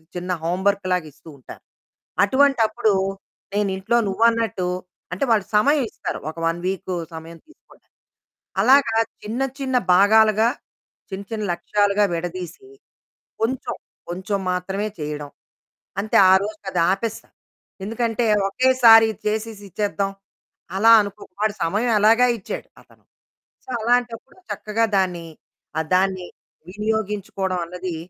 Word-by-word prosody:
చిన్న 180 +1 -4
హోంవర్క్ 190 +3 0
లాగ 180 -3 -1
ఇస్తూ 160 - -16
ఉంటారు. 130 - -13 0.6
అటువంటప్పుడు 235 -4 +2 0.6
నేనింట్లో 200 +3 0
నువ్వన్నట్టు, 225 -3 +1 0.5
అంటే 185 - -2
వాళ్ళు 210 -4 +3
సమయమిస్తారు 270 +1 +1
ఒక 165 - -22
1 165 +1 -1
వీక్ 185 -1 -3 0.2
సమయం 165 +1 -10
తీసుకోడానికి. 315 - -23 0.7
అలాగా 260 -4 +4 0.3
చిన్న 225 +5 -4 0.2
చిన్న 260 -2 0 0.2
భాగాలుగా, 215 +3 +5 0.6
చిన్న 195 +1 -6
చిన్న 215 -1 -3
లక్ష్యాలుగా 205 +2 +1
విడదీసి 175 - -6 0.7
కొంచెం, 245 +3 -2 0.4
కొంచెం 190 +3 -3
మాత్రమే 195 +3 -2
చేయడం, 150 -1 -5 0.7
అంతే 215 - -1 0.2
ఆరోజుకది 195 -2 0
ఆపేస్తాను. 220 +3 -5 0.5
ఎందుకంటే 230 +2 -1 0.2
ఒకేసారి 235 -1 +6 0.2
చేసేసి 215 -1 -3
ఇచ్చేద్దాం, 200 0 -1 0.7
అలా 225 +3 +5
అనుకో 200 -1 -5 0.2
వాడు 215 -1 +1
సమయం 215 +8 0
ఎలాగా 230 +4 +5
ఇచ్చాడు, 185 - -7
అతను. - - -26 0.6
సో - - -16
అలాంటప్పుడు 240 +4 -1
చక్కగా 220 +2 -1
దాన్ని, 180 -3 -1 0.7
దాన్ని 185 -1 +1 0.4
వినియోగించుకోవడం 200 -3 -2
అన్నది 180 0 -6
210 Hz, 105 wpm, -22 LUFS, 185-225 Hz, 0.7 s, ఒకేసారి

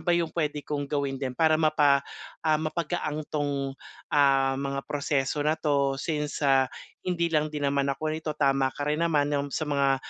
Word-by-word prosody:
ba 175 - +3
yung 170 -1 +2
pwede 150 -2 0
kong 145 -1 -2
gawin 140 -2 -1
din, 130 -2 -2
para 160 -1 +4
mapa 150 -3 +3 0.4
ah 155 -1 +3
mapagaan 155 -1 -2
'tong, 140 -2 -1 0.4
ah, 135 -2 +4
mga 140 0 -2
proseso 145 -1 0
na 155 +1 +2
'to 140 -2 +1
since, 150 -1 -2
ah, 135 -2 +4 0.4
hindi 170 -2 0
lang 155 -1 +2
din 150 -1 -4
naman 140 0 +1
ako 140 +3 -1
nito, 155 0 -3
tama 135 -2 +2
ka - - -4
rin 150 +1 +1
naman, 150 -4 +2
yung 145 0 0
sa 155 - -1
mga, 140 -1 +2
145 Hz, 185 wpm, -27 LUFS, 140-155 Hz, 0.4 s, para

